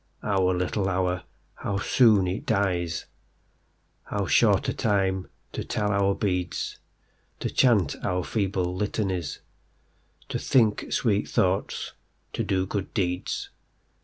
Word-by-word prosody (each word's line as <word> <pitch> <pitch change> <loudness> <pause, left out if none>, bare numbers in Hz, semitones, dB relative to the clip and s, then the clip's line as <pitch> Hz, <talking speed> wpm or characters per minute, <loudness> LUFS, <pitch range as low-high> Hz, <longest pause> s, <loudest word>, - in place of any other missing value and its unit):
Our 95 -3 +2
little 95 +2 0
hour,—how 90 +2 -3
soon 105 -1 +4
it 90 +2 -3
dies:How 90 -4 -4
short - - +4
a - - 0
time 95 -3 0 0.2
to - - -4
tell 105 -1 -1
our 100 -1 +2
beads, 90 -3 -2 0.6
To - - -2
chant 105 - +3
our 90 0 0
feeble 95 -4 -1
Litanies, 95 -6 -2 0.9
To - - -2
think 110 -5 +2
sweet 105 -4 +1
thoughts, 95 -4 0 0.4
to - - -1
do 95 -1 0
good 100 0 -3
deeds. 90 -2 -1
95 Hz, 110 wpm, -26 LUFS, 90-105 Hz, 0.9 s, soon